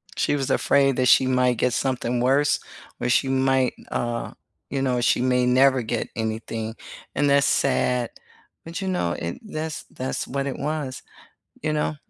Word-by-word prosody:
She - - +1
was 135 -2 -2
afraid 135 -1 +3
that 130 -1 +2
she 130 - +6
might 125 -1 +2
get 125 +1 +1
something 125 -2 -1
worse 135 +4 +3 0.4
or 120 - -1
she 130 +2 +3
might 130 -1 +2
n - - -17
uh, 120 -1 -2 0.4
you 135 0 -2
know, 125 -2 +1
she 120 0 +2
may 125 0 +2
never 130 +1 +4
get 115 0 -2
anything, 110 0 -3 0.4
and 145 +1 +2
that's 140 0 +4
sad. 125 -3 +1 0.6
But, 165 +3 -6
you 190 - -3
know, 135 - 0
and 85 0 -5
that's 160 -7 -5
that's 130 +1 -4
what 140 +1 -2
it 135 - -4
was, 145 -3 -3 0.6
you 155 - -1
know? 150 0 -1
130 Hz, 175 wpm, -24 LUFS, 125-140 Hz, 0.6 s, she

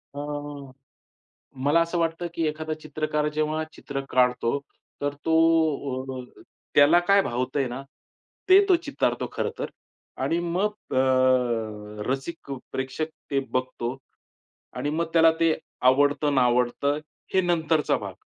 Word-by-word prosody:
अ, 145 - -5 1.5
मला 150 +4 +4
असं 170 +1 0
वाटतं, 165 +1 -1
की 165 -1 0
एखादा 155 +1 -3
चित्रकार 150 0 -1
जेव्हा 155 +1 0
चित्र 135 -1 -5
काढतो, 125 +1 +2 0.4
तर 145 0 -1
तो 160 - +2 1.0
अ, - - -14 0.3
त्याला 145 +5 +7
काय 200 0 +6
भावतंय 130 +3 -1
ना, 125 +3 -6 0.7
ते 390 +2 +8
तो 365 - +6
चितारतो 285 - -1
खरं - - -1
तर. - - -3 0.5
आणि 165 - +1
मग 185 +4 -2
अ, 120 -5 +1
रसिक 135 +3 -4 0.2
प्रेक्षक 135 +4 -2 0.2
ते 140 - +2
बघतो 130 -1 -2 0.8
आणि 135 +4 -1
मग 165 +2 -1
त्याला 165 -1 +6
ते 165 -1 +4 0.3
आवडतं-नावडतं, 140 0 +3 0.4
हे 190 - +5
नंतरचा 165 -3 +1
भाग. - - -7
145 Hz, 120 wpm, -25 LUFS, 130-165 Hz, 1.5 s, ते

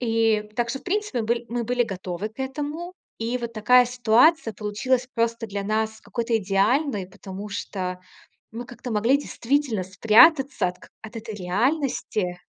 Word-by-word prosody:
И 225 -2 +2
так 240 -1 0
что, 270 - -3
в - - -25
принципе, 395 - -1
мы 215 - -5
быль 235 0 -1
мы 235 0 -2
были 245 +1 +1
готовы 190 0 -5
к 220 - -30
этому. 295 +6 -4 0.3
И 235 +2 -2
вот 235 -1 -5
такая 250 +3 +5
ситуация 245 +3 +3
получилась 240 +5 -1
просто 230 0 0
для 200 -1 -4
нас 220 +1 -1
какой-то 235 -1 -1
идеальной, 205 +3 +1
потому 195 +2 -8
что 185 -3 -4 0.5
мы 235 +2 -6
как-то 245 0 -8
могли 230 +6 +3
действительно 270 -6 -1
спрятаться 225 - +5
от 180 0 -6
как - - -17
от 220 +1 -10
этой 220 -1 -7
реальности. 205 - -1
230 Hz, 165 wpm, -24 LUFS, 210-250 Hz, 0.5 s, такая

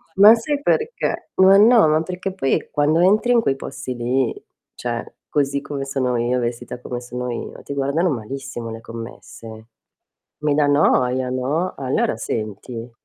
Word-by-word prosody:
Ma 205 +3 +9
sai 285 +5 -2
perché? 450 +7 -1
Ma 190 +1 +7
no, 225 -2 +6
ma 155 +1 +3
perché 185 +2 -5
poi 135 -8 -1
quando 150 +2 +2
entri 210 +6 +3
in 235 - +4
quei 135 - 0
posti 135 -1 -6
lì, 125 +1 -1 0.3
cioè 120 -1 -4 0.2
così 140 -1 0
come 140 -1 -5
sono 130 -2 -1
io, 120 +2 0
vestita 120 +1 -4
come 125 -1 -5
sono 125 0 -5
io, - - -6
ti 140 - -6
guardano 140 +6 +1
malissimo 130 -1 -5
le 115 0 -8
commesse. 115 -1 -10 0.7
Mi 150 -1 0
dà 145 0 +3
noia, 130 -3 +2
no? 140 +8 -1
Allora 130 -4 0
senti 115 +2 -5
135 Hz, 155 wpm, -21 LUFS, 120-160 Hz, 0.7 s, Ma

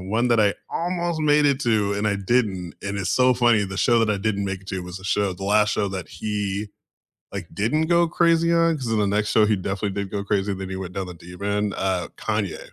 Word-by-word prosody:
one 110 +6 0
that 120 -1 +3
I 100 -1 +3 0.2
almost 170 -1 -2
made 150 -1 +4
it 140 -2 +3
to 105 -4 +2
and 105 +1 -1
I 100 - +1
didn't, 100 -4 -1
and 100 0 -3
it's 95 -3 -2
so 125 0 +4
funny, 120 -4 +3
the 95 0 -6
show 120 +3 +3
that 115 -1 +2
I 105 - +1
didn't 100 0 -1
make 95 -1 -3
it 95 - -16
to 95 -1 -3
was 90 +1 -8
a - - -14
show 100 0 +1
the 95 +2 -10
last 105 +1 +3
show 100 -2 0
that 95 -4 -5
he, 105 -1 -3 0.6
like, - - -6
didn't 115 - +1
go 170 0 +4
crazy 170 0 +3
on, 165 -1 +3
'cause 130 -5 -5
in 110 - +2
the 100 - +2
next 105 +1 0
show 110 -1 +5
he 105 - +3
definitely 95 +1 -3
did 100 - -6
go 100 -1 -2
crazy, 100 0 0
then 95 0 -6
he 95 - -4
went 95 -1 -5
down 95 -1 -3
the 90 - -7
deep 90 +2 -12
end, 100 0 0
uh, 95 -2 -1
Kanye. 105 -3 -2
105 Hz, 255 wpm, -23 LUFS, 95-120 Hz, 0.6 s, show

